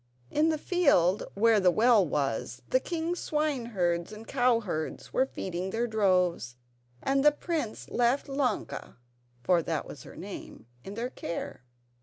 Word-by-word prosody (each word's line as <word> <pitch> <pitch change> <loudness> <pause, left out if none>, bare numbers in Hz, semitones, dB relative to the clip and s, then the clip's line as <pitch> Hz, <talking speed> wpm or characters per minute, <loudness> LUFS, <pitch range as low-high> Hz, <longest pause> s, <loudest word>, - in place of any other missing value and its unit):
In 310 +2 +3
the 315 - +1
field 280 - +2
where 220 +1 +4
the 185 -2 +5
well 220 +3 +5
was, 130 -5 -2
the 255 - +5
king's 340 +4 -3
swineherds 230 - -1
and 215 +1 -10
cowherds 230 - 0
were 260 - +2
feeding 185 -5 -4
their 230 +4 0
droves, 180 - +1 0.5
and 275 0 +2
the 295 - +7
prince 300 -6 -4
left 245 +3 +1
Ilonka 270 -5 -2 0.5
(for 180 -2 +3
that - - -2
was - - -10
her - - -12
name) - - -9 0.2
in 195 - -8
their 240 +3 -3
care. 165 - -6
225 Hz, 145 wpm, -29 LUFS, 180-275 Hz, 0.5 s, the